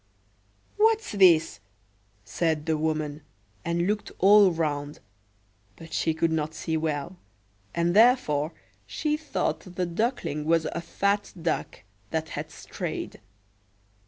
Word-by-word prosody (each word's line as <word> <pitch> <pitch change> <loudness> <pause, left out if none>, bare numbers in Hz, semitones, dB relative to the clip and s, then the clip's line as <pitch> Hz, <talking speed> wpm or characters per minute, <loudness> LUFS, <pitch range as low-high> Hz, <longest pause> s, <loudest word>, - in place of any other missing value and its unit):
"What's 445 +1 +3
this?" 175 - +4 0.7
said 150 +7 -1
the 160 - +1
woman, 155 -1 -2 0.4
and 170 +1 0
looked 210 +2 -2
all 200 +1 +7
round; 150 -3 -2 0.8
but 165 -1 -12
she 160 - 0
could 165 +1 +1
not 155 -1 -2
see 160 - -2
well, 155 +2 -2 0.6
and 170 +1 +1
therefore 210 - +4 0.4
she 300 -1 -1
thought 305 -1 -2
the 185 -1 -4
Duckling 175 - -2
was 165 0 +2
a 170 - -4
fat 200 +4 -1
duck 160 -9 -3 0.3
that 160 0 -2
had - - -5
strayed. - - -6
165 Hz, 120 wpm, -26 LUFS, 155-200 Hz, 0.8 s, all